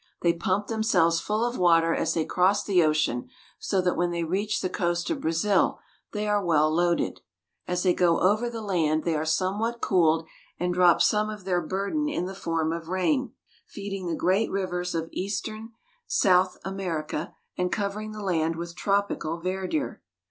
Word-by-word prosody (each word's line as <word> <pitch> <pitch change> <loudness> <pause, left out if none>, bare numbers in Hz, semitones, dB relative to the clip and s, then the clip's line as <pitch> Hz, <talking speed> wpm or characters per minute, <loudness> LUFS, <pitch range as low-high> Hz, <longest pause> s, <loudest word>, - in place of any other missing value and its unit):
They 170 -1 +4
pump 185 +4 -1
themselves 190 -8 +2
full 215 +5 -1
of 240 +1 -3
water 165 -2 +4
as 165 0 0
they 160 -2 +1
cross 195 +3 +2
the 190 -4 +3
ocean, 155 -6 0 0.3
so 195 -2 0
that 180 -1 +1
when 175 0 +1
they 170 -1 -2
reach 200 +5 -1
the - - 0
coast 175 - -1
of 305 - -2
Brazil 170 +4 +1 0.3
they 210 0 -2
are 205 -1 +1
well 155 -3 +3
loaded. 175 +1 +1 0.5
As 180 0 -1
they 180 -2 +4
go 175 -2 +3
over 215 +6 +2
the 230 -2 -6
land 160 -6 +1
they 165 -2 0
are 155 +1 -1
somewhat 200 +8 0
cooled, 165 -6 +2 0.3
and 180 0 0
drop 180 -1 +5
some 215 0 +2
of 210 -2 -7
their 180 -2 +1
burden 200 - -1
in 295 -12 -2
the 190 - -5
form 165 -4 -1
of 165 -1 -6
rain, 230 - 0 0.3
feeding 195 -3 -6
the 165 - -1
great 190 +7 +1
rivers 180 -2 -2
of 165 0 -2
eastern 215 +3 -4 0.4
South 185 -3 +3
America, 175 -5 -4 0.2
and 180 0 -1
covering 210 +1 -3
the 215 -1 -7
land 165 -3 0
with 170 +1 -6
tropical 200 -5 -1
verdure. 185 - -2
180 Hz, 175 wpm, -26 LUFS, 170-205 Hz, 0.5 s, drop